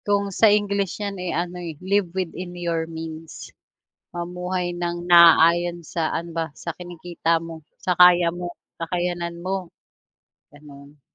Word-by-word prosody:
Kung 200 -1 0
sa 220 +3 +5
English 200 -2 +1
yan, 205 -1 -3
eh, 180 - -3
ano 175 +2 -3
eh, 165 -3 -6
live 190 +2 0
within 180 0 -4
your 165 -2 -2
means 160 0 -8 0.6
mamuhay 180 +1 -3
nang 175 0 -3
naaayon 170 0 +6
sa 160 0 -2
ano 170 +1 -3
ba, 165 -1 0
sa 170 - -5
kinikita 175 -1 -2
mo, 165 -1 -9 0.2
sa 180 - 0
kaya 175 -1 +6
mo, 175 0 -5 0.3
kakayanan 175 0 -2
mo, 185 0 -3 0.9
ganon. 145 0 -15
175 Hz, 140 wpm, -23 LUFS, 165-180 Hz, 0.9 s, naaayon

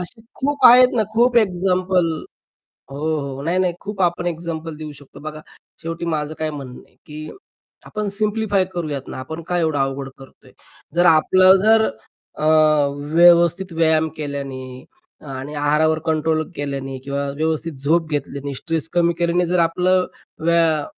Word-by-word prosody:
असे 180 +6 -7 0.2
खूप 280 -1 -1
आहेत 250 +1 +8
ना. 220 - +3
खूप 240 +1 +3
एक्झाम्पल. 185 -3 +2 0.8
हो, 155 +3 -2
हो. 140 -1 -6
नाही-नाही 180 +2 +1
खूप 205 -1 -7
आपण 175 0 0
एक्झाम्पल 165 -2 -4
देऊ 155 -1 -8
शकतो 140 - -15
बघा 155 0 -7 0.4
शेवटी 165 +1 -5
माझं 150 0 -3
काय 155 0 -2
म्हणणं 135 -4 -8
आहे, - - -31
की 155 +1 -8 0.6
आपण 210 -1 -4
सिम्प्लिफाय 210 -1 0
करूयात 150 -6 -4
ना - - -7
आपण 160 +6 -7
काय 175 -1 0
एवढं 160 -3 0
अवघड 135 0 -2
करतोय? 135 -1 -17 0.4
जर 175 +1 +3
आपलं 185 +4 +6
जर 220 0 +5 0.5
अ, - - -2 0.7
व्यवस्थित 170 +2 +5
व्यायाम 160 -1 +2
केल्याने 135 -4 -6 0.4
आणि 135 +2 -7
आहारावर 150 +2 +2
कंट्रोल 160 0 +1
केल्याने 135 -2 -4
किंवा 140 0 -3
व्यवस्थित 160 +1 -1
झोप 165 +2 +2
घेतल्याने, 140 -1 -4
स्ट्रेस 165 +3 -3
कमी 170 -1 +2
केल्याने 175 +1 +1
जर 180 +1 0
आपलं 180 +2 +2 0.4
व्या 165 -3 +2
160 Hz, 145 wpm, -20 LUFS, 145-180 Hz, 0.8 s, आहेत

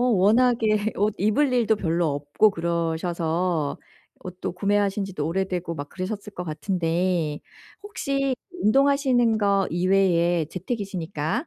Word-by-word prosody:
워낙에 220 -1 +3
옷 205 +1 +1
입을 215 +8 +2
일도 230 -3 +2
별로 170 -3 0
없고 145 +9 +2
그러셔서 170 -2 -1 0.5
옷도 180 -1 -5
구매하신 200 +1 0
지도 185 -6 -4
오래되고 180 -1 -2
막 145 -1 -6
그러셨을 200 +2 -6
것 180 - -5
같은데 170 -1 -1 0.4
혹시 275 -10 -1 0.3
운동하시는 260 -2 +3
거 200 -2 +2
이외에 175 -2 +2
재택이시니까 190 - -3
190 Hz, 285 characters per minute, -24 LUFS, 170-215 Hz, 0.5 s, 워낙에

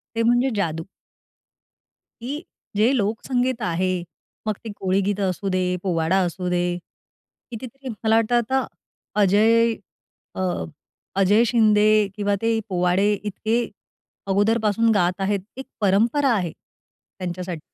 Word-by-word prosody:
ते 230 - +1
म्हणजे 245 +3 +3
जादू. 165 -5 -1 1.4
की 280 +6 -4 0.3
जे 220 +5 +4
लोकसंगीत 245 +3 -1
आहे, 180 0 0 0.4
मग 210 - 0
ती 220 - -5
कोळीगीतं 195 +1 0
असू 195 +2 -4
दे, 185 - +1 0.2
पोवाडा 175 0 +1
असू 180 +1 -4
दे, 175 0 +1 0.9
कितीतरी 260 +3 -8
मला 220 -1 +1
वाटतं 225 +1 +2
आता 260 +3 +1 0.5
अजय, 225 +4 +4 0.6
अ - - -5 0.8
अजय 205 +4 +5
शिंदे 215 -3 +4 0.3
किंवा 205 -1 0
ते 225 0 +2
पोवाडे 180 +3 +2
इतके 210 +3 -2 0.7
अगोदरपासून 215 +2 +2
गात 180 -1 +1
आहेत, 195 +1 0 0.2
एक 265 - -7
परंपरा 230 +8 +3
आहे 180 -6 -1
त्यांच्यासाठी. 180 -2 -8
205 Hz, 115 wpm, -23 LUFS, 185-230 Hz, 1.4 s, अजय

